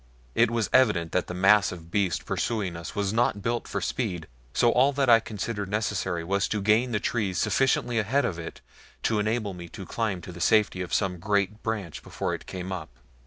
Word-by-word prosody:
It 115 0 +4
was 115 -2 0
evident 105 -11 +3
that 90 - 0
the 90 - -5
massive 90 -3 +3
beast 95 -5 0
pursuing 105 -7 -1
us 85 +3 -7
was 100 -1 0
not 115 -3 +1
built 120 0 -1
for - - -3
speed, 90 -10 -2 0.3
so 120 - +3
all 130 +4 +4
that 135 -3 +3
I 115 - +8
considered 105 -2 -4
necessary 105 -5 -1
was 100 +3 0
to 105 - -1
gain 110 +5 +3
the 105 - +1
trees 100 -6 -1
sufficiently 120 +3 +2
ahead 130 +7 +1
of 85 -4 -3
it 80 - -8 0.4
to 110 -2 +1
enable 110 -1 -1
me 85 -1 -9
to 95 +1 -8
climb 110 -4 -2
to 90 - -9
the 85 0 -9
safety 105 -3 +3
of 90 - -5
some 95 -4 0
great 100 +2 0
branch 105 -8 -4
before - - -3
it - - -7
came 95 0 -5
up. 90 -7 -5
105 Hz, 205 wpm, -27 LUFS, 90-115 Hz, 0.4 s, I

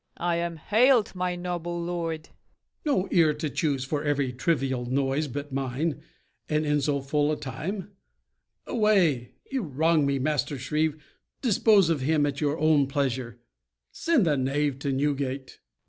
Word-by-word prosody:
I 170 -1 0
am 170 -1 -2
hailed, 225 - +3
my 180 -1 -2
noble 175 -1 -4
lord. 170 -2 -3 0.6
MORE. 285 - +3
No - - -7
ear 160 -4 +4
to 150 -1 -3
choose 140 -6 -1
for 145 +2 -2
every 140 -3 0
trivial 130 -3 0
noise 135 +3 0
but 145 +1 -6
mine, 135 +3 -2 0.5
and 155 0 +1
in 150 0 +2
so 140 0 0
full 145 +2 +1
a 155 - -2
time? 180 +8 -5 0.7
Away! 185 - +2 0.2
You 270 -1 0
wrong 160 -2 +2
me, 140 0 +1
Master 145 +1 -1
Shrieve: 150 +3 0 0.5
dispose 210 -6 +4
of 150 -5 0
him 150 +2 +2
At 140 0 -3
your 150 +1 +1
own 155 -3 +3
pleasure; 130 -4 -2 0.5
send 325 - +2
the 150 -3 +2
knave 135 +1 0
to 140 0 -2
Newgate. 135 -1 -1
FAULKNER. - - -47
150 Hz, 160 wpm, -27 LUFS, 135-170 Hz, 0.7 s, ear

